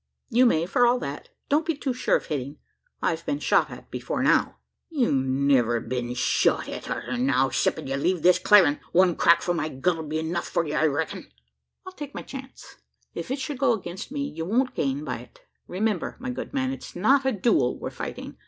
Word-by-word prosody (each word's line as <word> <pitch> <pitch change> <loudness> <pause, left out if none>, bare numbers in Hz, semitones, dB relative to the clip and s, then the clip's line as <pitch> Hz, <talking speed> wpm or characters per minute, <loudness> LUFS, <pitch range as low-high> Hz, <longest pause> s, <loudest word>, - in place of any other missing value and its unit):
"You 245 +2 +5
may, 165 -7 +2
for 240 +7 +3
all 245 +1 +3
that. 370 - -6 0.2
Don't 295 +3 +2
be 325 0 -1
too 275 -2 -2
sure 250 - +1
of - - -1
hitting 145 -1 -4 0.5
I've 165 0 0
been 285 +1 -1
shot - - +2
at - - -12
before - - -3
now." - - +2 0.3
"You'll 280 -8 +1
niver 130 -3 +2
be 125 +1 -4
shot 125 - +2
at - - -7
arter 120 0 -3
now, 130 +1 +2
'ceptin' - - 0
ye 135 0 -2
leave 175 +3 0
this 180 0 +5
clarin'. 185 -9 +5
One 180 -1 +4
crack 170 0 +4
from 175 -1 0
my 155 - -1
gun'll 160 +3 -1
be 155 +1 -2
enuf 165 +2 -2
for 170 - -1
ye, 150 - -4
I 160 - +3
reck'n." 155 +2 -3 0.6
"I'll 375 - -7
take 290 -5 -8
my - - -5
chance. 270 -1 -10 0.4
If - - -6
it 265 - -1
should 270 0 -5
go 270 -4 +4
against 185 0 -6
me, 285 -1 -3
you 280 -12 -5
won't 245 +9 +1
gain 140 +1 -1
by - - -3
it. - - -16 0.3
Remember, 200 0 -2
my 255 0 -4
good 250 - -6
man, 265 -1 -1
it's 270 - -8
not 265 +10 +3
a 265 - +2
duel 200 - +1
we're - - -5
fighting! - - -7
180 Hz, 210 wpm, -25 LUFS, -, 0.6 s, You